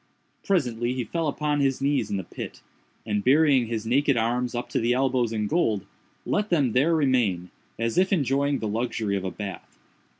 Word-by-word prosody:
Presently 125 Hz, -, 0 dB
he 125 Hz, -, -1 dB
fell 165 Hz, +5 st, -2 dB
upon 150 Hz, 0 st, -1 dB
his 135 Hz, -2 st, +1 dB
knees 135 Hz, -5 st, 0 dB
in 100 Hz, -, -1 dB
the 95 Hz, -, -4 dB
pit, -, -, -8 dB, 0.4 s
and, 105 Hz, -1 st, -1 dB
burying 135 Hz, -2 st, +4 dB
his 110 Hz, -1 st, -3 dB
naked 135 Hz, +3 st, +2 dB
arms 120 Hz, +2 st, 0 dB
up 120 Hz, -, -3 dB
to -, -, 0 dB
the 120 Hz, +1 st, +2 dB
elbows 130 Hz, -2 st, +1 dB
in 110 Hz, -2 st, -1 dB
gold, 105 Hz, -, 0 dB, 0.4 s
let 210 Hz, +1 st, 0 dB
them 145 Hz, -8 st, +2 dB
there 145 Hz, +8 st, +3 dB
remain, 120 Hz, -, +1 dB, 0.3 s
as 115 Hz, +6 st, 0 dB
if 190 Hz, +1 st, +2 dB
enjoying 140 Hz, -4 st, +1 dB
the 110 Hz, -, -3 dB
luxury 110 Hz, -1 st, -1 dB
of 95 Hz, -, -2 dB
a 95 Hz, -, -2 dB
bath. 100 Hz, +1 st, -8 dB
125 Hz, 190 wpm, -25 LUFS, 110-140 Hz, 0.4 s, burying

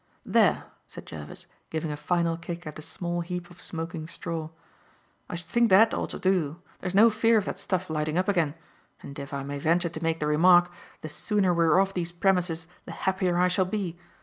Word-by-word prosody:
"There," -, -, +3 dB, 0.2 s
said -, -, -10 dB
Jervis, 75 Hz, -2 st, -9 dB, 0.2 s
giving 160 Hz, -1 st, -3 dB
a -, -, -3 dB
final 170 Hz, +2 st, 0 dB
kick 170 Hz, +1 st, -7 dB
at 150 Hz, 0 st, -7 dB
a -, -, -7 dB
small 175 Hz, +2 st, -4 dB
heap 175 Hz, 0 st, -5 dB
of 175 Hz, -, -12 dB
smoking 165 Hz, -1 st, -5 dB
straw, 165 Hz, -1 st, -4 dB, 0.8 s
"I -, -, -4 dB
should 170 Hz, 0 st, -7 dB
think 235 Hz, +6 st, +2 dB
that 215 Hz, +4 st, +6 dB
ought -, -, -2 dB
to -, -, -5 dB
do. 175 Hz, -4 st, 0 dB, 0.2 s
There's 185 Hz, 0 st, -4 dB
no 225 Hz, +3 st, +7 dB
fear 225 Hz, +1 st, +3 dB
of 205 Hz, -, +1 dB
that -, -, -4 dB
stuff 185 Hz, -1 st, -1 dB
lighting 155 Hz, 0 st, -1 dB
up 185 Hz, -, +1 dB
again. 165 Hz, -7 st, +1 dB, 0.5 s
And, 140 Hz, +1 st, -8 dB
if 140 Hz, -1 st, -7 dB
I 140 Hz, -1 st, -3 dB
may 140 Hz, +1 st, -5 dB
venture 170 Hz, +3 st, +2 dB
to 160 Hz, -1 st, -7 dB
make 165 Hz, 0 st, 0 dB
the 150 Hz, -, -1 dB
remark, 175 Hz, +4 st, +5 dB, 0.3 s
the 155 Hz, -, -6 dB
sooner 195 Hz, +3 st, +1 dB
we 170 Hz, -1 st, +3 dB
are 160 Hz, +3 st, +5 dB
off 195 Hz, 0 st, +1 dB
these 175 Hz, -2 st, -2 dB
premises 175 Hz, -2 st, +1 dB, 0.2 s
the -, -, -8 dB
happier 185 Hz, -2 st, 0 dB
I 180 Hz, +1 st, +4 dB
shall 185 Hz, +1 st, +1 dB
be. 185 Hz, -3 st, -3 dB
175 Hz, 215 wpm, -27 LUFS, 160-185 Hz, 0.8 s, no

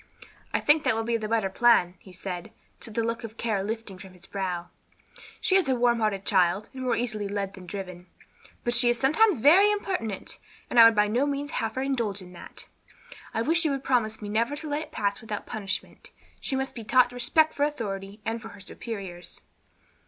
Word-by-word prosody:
"I -, -, +1 dB
think 295 Hz, +1 st, +4 dB
that -, -, +2 dB
will 225 Hz, -, -1 dB
be 230 Hz, +1 st, 0 dB
the 215 Hz, -1 st, -4 dB
better 220 Hz, -3 st, 0 dB
plan," 210 Hz, -5 st, +4 dB
he 190 Hz, -, -15 dB
said, 180 Hz, -1 st, -6 dB, 0.3 s
the 225 Hz, 0 st, -3 dB
look 230 Hz, +1 st, -2 dB
of 225 Hz, 0 st, -8 dB
care 215 Hz, -4 st, -1 dB
lifting 215 Hz, -2 st, -5 dB
from 190 Hz, -1 st, -11 dB
his 180 Hz, +1 st, -8 dB
brow; 180 Hz, -3 st, -3 dB, 0.7 s
"she 375 Hz, -, +2 dB
is 370 Hz, -8 st, +3 dB
a 260 Hz, -, +3 dB
warm 240 Hz, -1 st, +2 dB
hearted 210 Hz, -3 st, -1 dB
child, 190 Hz, +1 st, +2 dB
and 260 Hz, -, -7 dB
more 255 Hz, -1 st, +1 dB
easily 215 Hz, -4 st, -2 dB
led 200 Hz, -1 st, -3 dB
than 185 Hz, -2 st, -12 dB
driven. 180 Hz, -2 st, -7 dB, 0.6 s
But 240 Hz, -, 0 dB
she 240 Hz, 0 st, +5 dB
is 240 Hz, -, +2 dB
sometimes 315 Hz, -, +4 dB
very 355 Hz, -, +6 dB
impertinent, 370 Hz, -, -3 dB, 0.3 s
and 240 Hz, -, +4 dB
I 230 Hz, -, +11 dB
would 230 Hz, -1 st, +6 dB
by 210 Hz, 0 st, +4 dB
no 245 Hz, +7 st, +1 dB
means 285 Hz, 0 st, -3 dB
have 225 Hz, -1 st, -2 dB
her 260 Hz, -, -1 dB
indulged 230 Hz, -8 st, -1 dB
in 180 Hz, 0 st, -13 dB
that. 175 Hz, -, -11 dB, 0.7 s
I 225 Hz, -, -1 dB
wish 330 Hz, +6 st, +2 dB
you 315 Hz, -, +2 dB
would 275 Hz, -1 st, -2 dB
promise 220 Hz, -4 st, 0 dB
me 205 Hz, -, -5 dB
never 230 Hz, +6 st, 0 dB
to 310 Hz, +1 st, -7 dB
let 290 Hz, +1 st, -1 dB
it -, -, -9 dB
pass 200 Hz, 0 st, -1 dB
without 215 Hz, -2 st, -5 dB
punishment. 200 Hz, -3 st, -5 dB, 0.3 s
She 270 Hz, -, -2 dB
must 265 Hz, 0 st, -2 dB
be 230 Hz, -, -7 dB
taught 245 Hz, +2 st, +4 dB
respect 310 Hz, +6 st, +3 dB
for -, -, -7 dB
authority 205 Hz, -8 st, -3 dB
and 225 Hz, +1 st, -2 dB
for 225 Hz, -, -8 dB
her 200 Hz, -, -13 dB
superiors." 190 Hz, -3 st, -7 dB
225 Hz, 210 wpm, -27 LUFS, 200-260 Hz, 0.7 s, I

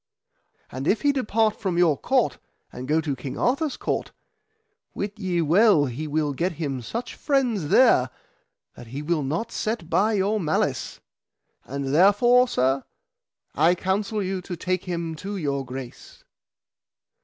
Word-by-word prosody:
And 130 Hz, +4 st, -5 dB
if 210 Hz, -, +1 dB
he 290 Hz, -, +4 dB
depart 225 Hz, -5 st, 0 dB
from 185 Hz, -5 st, -1 dB
your 170 Hz, -4 st, +4 dB
court 255 Hz, -, 0 dB, 0.3 s
and 125 Hz, +1 st, -7 dB
go 155 Hz, +2 st, +2 dB
to 145 Hz, -3 st, -2 dB
King 130 Hz, +1 st, -7 dB
Arthur's 275 Hz, +3 st, 0 dB
court, -, -, -2 dB, 0.8 s
wit 205 Hz, +1 st, -4 dB
ye 180 Hz, -4 st, 0 dB
well 175 Hz, 0 st, +5 dB
he 140 Hz, +4 st, -5 dB
will 150 Hz, -1 st, 0 dB
get 170 Hz, +6 st, -1 dB
him 140 Hz, -5 st, -4 dB
such 235 Hz, -, -5 dB
friends 245 Hz, -, 0 dB
there 175 Hz, -, +5 dB, 0.6 s
that 120 Hz, -, -12 dB
he 135 Hz, +6 st, -6 dB
will 165 Hz, 0 st, 0 dB
not 165 Hz, +12 st, -3 dB
set 215 Hz, -6 st, -3 dB
by 215 Hz, +3 st, +3 dB
your 205 Hz, +2 st, +1 dB
malice. 155 Hz, -4 st, -1 dB, 0.6 s
And 140 Hz, 0 st, -4 dB
therefore, 225 Hz, +9 st, +5 dB
sir, 135 Hz, -, +1 dB, 0.7 s
I 170 Hz, +3 st, +3 dB
counsel 200 Hz, +3 st, -1 dB
you 190 Hz, 0 st, -3 dB
to 180 Hz, 0 st, -6 dB
take 185 Hz, +1 st, -2 dB
him 170 Hz, -2 st, -3 dB
to 200 Hz, +5 st, -5 dB
your 140 Hz, -5 st, -2 dB
grace. 130 Hz, -1 st, -9 dB
175 Hz, 150 wpm, -24 LUFS, 145-215 Hz, 0.8 s, well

